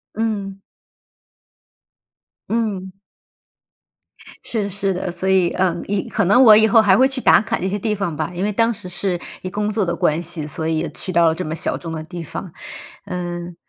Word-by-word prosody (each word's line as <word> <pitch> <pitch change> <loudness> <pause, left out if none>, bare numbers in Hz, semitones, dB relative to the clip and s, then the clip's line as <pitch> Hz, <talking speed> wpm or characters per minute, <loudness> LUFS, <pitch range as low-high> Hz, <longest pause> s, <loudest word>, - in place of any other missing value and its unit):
嗯。 200 -3 -3 1.9
嗯。 210 -5 -2 1.5
是 220 -3 -2
的 200 - -3
是 195 0 -1
的。 180 0 -3
所 180 +2 -4
以， 185 -2 +4
呃， 185 -2 +1
以 200 -1 -1
可 200 - 0
能 225 +8 +6
我 220 -4 +9
以 220 +1 +6
后 225 0 +6
还 195 -3 +4
会 260 - +5
去 265 -1 -2
打 - - +6
卡 220 - -2
这 185 - -2
些 195 +2 -1
地 210 +1 -1
方 195 -6 -3
吧， 155 +3 -3
因 180 - -2
为 210 - 0
当 230 +3 +2
时 205 -4 -7
是 180 0 0 0.2
以 185 - -5
工 210 +2 -2
作 210 -2 0
的 170 -1 -1
关 155 0 +1
系， 170 -2 -5
所 160 +2 -3
以 160 0 0
也 160 0 -2
去 185 - -4
到 170 -1 +4
了 160 -1 +3
这 185 - -4
么 155 +1 -3
小 - - -1
众 165 - -7
的 160 -1 -5
地 175 +2 -8
方。 175 +3 -7 0.5
嗯， 175 -2 -5
190 Hz, 220 characters per minute, -20 LUFS, 170-210 Hz, 1.9 s, 我